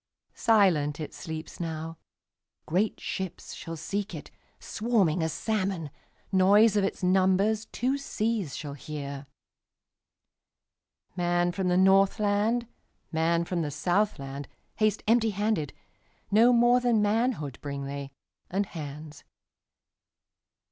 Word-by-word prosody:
Silent 170 -10 +3
it 155 - -6
sleeps 160 -1 -7
now; 165 -1 -4 0.7
Great 190 +7 0
ships 190 -2 -5
shall 165 0 -7
seek 200 +6 -3
it, - - -9 0.3
Swarming 210 -8 +1
as 160 0 0
salmon; 190 -8 -2 0.4
Noise 200 +3 +5
of 205 - +3
its 195 - -2
numbersTwo 200 +8 +2
seas 215 - -2
shall 145 -2 -6
hear. 140 -1 -7 1.9
Man 175 -1 +1
from 185 +1 -2
the 180 0 +2
Northland, 205 +4 +3 0.5
Man 170 +1 +1
from 175 -1 -2
the 150 - -2
Southland, 145 -3 -1 0.3
Haste 215 -1 +1
empty 225 0 +4
handed; 205 -7 -1 0.6
No 225 +4 +6
more 240 +1 +5
than 240 -4 +2
manhoodBring 150 - -1
they, 140 0 -6 0.4
and 200 +3 0
hands. 150 -2 -8
185 Hz, 105 wpm, -28 LUFS, 155-215 Hz, 1.9 s, No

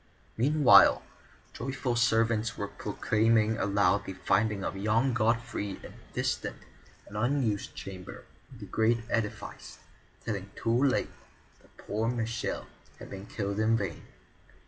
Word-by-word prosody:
Meanwhile 140 +2 +6 0.5
joyful 130 -1 -2
servants 115 -1 +2
were - - -3
proclaiming 110 0 +1
aloud 100 0 +2
the 95 - -5
finding 100 +2 +1
of - - -3
young 110 +6 +1
Godfrey 115 -3 -1
in - - -10
a - - -20
distant - - -1 0.5
and 105 - -12
unused 120 -2 0
chamber 95 -2 -8 0.3
of 125 - -13
the - - -6
great 110 +3 +1
edifice, 115 -3 -3 0.5
telling 100 -3 -3
too 120 +4 +1
late 130 -2 +1 0.5
that - - -26
poor 110 +2 -2
Michel 115 -1 -2 0.3
had - - -11
been 95 +1 -8
killed 100 -1 -3
in 110 +1 +3
vain. 95 -7 -4
110 Hz, 130 wpm, -29 LUFS, 100-120 Hz, 0.5 s, Meanwhile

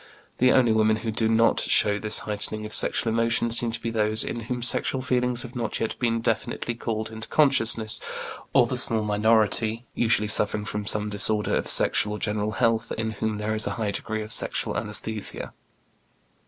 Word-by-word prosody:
The 125 +1 +4
only 125 -3 +3
women 110 0 +2
who 110 +1 -4
do 110 +1 -1
not 115 +1 +3
show 105 -1 +1
this 110 0 +2
heightening 105 0 -4
of 105 - -6
sexual 115 - +3
emotion 115 0 0
seem 120 0 0
to 115 0 -4
be 115 -1 -4
those 110 -1 +1
in 120 - -5
whom 120 +1 -5
sexual 130 +2 +3
feelings 125 -1 -1
have 125 +1 -11
not 115 -3 -3
yet 110 - -2
been 115 -2 -1
definitely 120 +1 -2
called 110 -2 -5
into 110 0 -7
consciousness, 115 -7 +3 0.5
or - - +4
the - - -4
small 110 -1 +2
minority, 110 +2 +1
usually 110 -2 +1
suffering 105 0 +1
from 105 -1 -5
some 105 -1 -1
disorder 105 +1 +2
of - - -3
sexual 105 - +3
or 105 - -6
general 105 0 -2
health, 115 +1 0
in 110 0 -3
whom 110 0 -3
there 105 +1 -3
is 110 0 +1
a - - -2
high 110 -3 -2
degree 110 +1 -4
of 110 - -7
sexual - - +3
anæsthesia. 110 -2 -3
110 Hz, 190 wpm, -24 LUFS, 105-115 Hz, 0.5 s, The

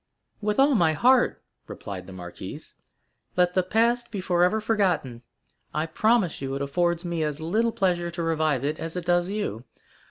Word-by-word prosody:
"With 210 0 -1
all 275 +2 +5
my 170 -9 +3
heart," 245 - +3 0.2
replied 95 -3 -7
the - - -10
marquise; 90 -1 -9 0.6
"let 180 0 +3
the 185 - +3
past 230 +6 +1
be 205 - -5
forever 180 +3 +2
forgotten. 180 - 0 0.5
I 155 +1 +1
promise 215 - +1
you 135 0 -3
it 140 - -3
affords 170 +4 0
me 170 -2 -1
as 150 -1 -2
little 215 +9 +1
pleasure 175 -4 0
to 170 0 -4
revive 155 -5 +1
it 150 +2 -2
as 165 +1 -5
it 180 -2 -4
does 175 0 +2
you. 195 - -3
175 Hz, 170 wpm, -25 LUFS, 155-210 Hz, 0.6 s, all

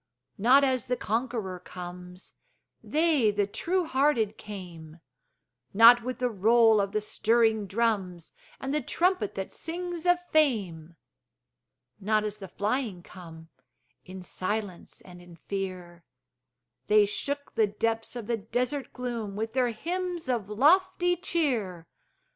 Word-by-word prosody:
Not 255 +7 +5
as 260 -4 0
the 250 - 0
conqueror 225 -6 -3
comes, 180 0 -10 0.5
They, 305 -7 +2
the 205 -1 +1
true 355 - -1
hearted 260 -7 +1
came; 175 -6 -10 0.8
Not 235 +3 +8
with 255 +2 -4
the 250 -1 0
roll 220 +1 +4
of 200 0 -2
the 215 - -1
stirring 220 0 +1
drums, 195 -5 -1 0.3
And 270 +1 -4
the 300 - +1
trumpet 345 - 0
that 190 -1 -5
sings 350 +1 -5
of 355 0 +5
fame; 190 - +1 1.0
Not 215 +1 +1
as 210 0 -4
the 195 -2 -9
flying 205 -1 -2
come, 165 -3 -12 0.5
In 185 0 -10
silence 195 0 -5
and 180 -1 -14
in 175 -1 -14
fear; 180 -1 -6 0.8
They 210 0 +5
shook 285 +7 -4
the 220 -2 +3
depths 225 +3 -2
of 235 -3 -6
the 235 +1 -1
desert 245 +6 -3
gloom 235 -5 -4
With 220 +2 -4
their 250 -1 +2
hymns 345 +7 -4
of 235 -6 -2
lofty 355 - +3
cheer. 245 - -2
220 Hz, 130 wpm, -27 LUFS, 190-260 Hz, 1.0 s, Not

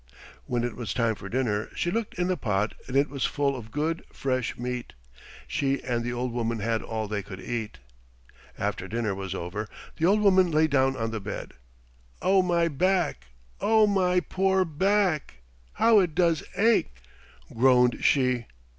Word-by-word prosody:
When 120 -1 -1
it 120 -2 -3
was 120 -5 -4
time 115 -2 +2
for 100 -2 -9
dinner 110 -4 -1
she 175 - -1
looked 225 +1 -2
in 180 - 0
the 185 0 +1
pot 105 - -1
and 130 - -1
it 140 +1 +4
was 135 -2 -4
full 140 -1 0
of 115 -4 -8
good, 155 +6 -2
fresh 130 -2 -2
meat. 125 0 -4 0.5
She 140 -2 0
and 120 -2 -1
the 120 - -2
old 125 0 -2
woman 115 -1 -1
had 115 +1 -1
all 110 -1 -4
they 105 -1 -2
could 95 -1 -9
eat. 110 -6 -4 0.8
After - - -3
dinner 115 -2 -1
was 95 -1 -5
over 95 +5 -5 0.3
the 165 - +2
old 210 +3 +4
woman 190 -3 +5
lay 155 0 +3
down 135 -3 +2
on 115 -1 -2
the 110 -2 -4
bed. 100 +1 -6 0.7
"Oh, 190 +2 +4
my 170 -2 +2
back! 170 - 0 0.3
Oh, 220 0 +4
my 185 -3 +2
poor 190 0 +1
back! 175 - 0 0.3
How 225 -2 +5
it 175 -5 0
does 170 -2 +2 0.2
ache," 215 - +3 0.6
groaned 125 0 +4
she. 125 -4 +2
130 Hz, 170 wpm, -27 LUFS, 115-180 Hz, 0.8 s, woman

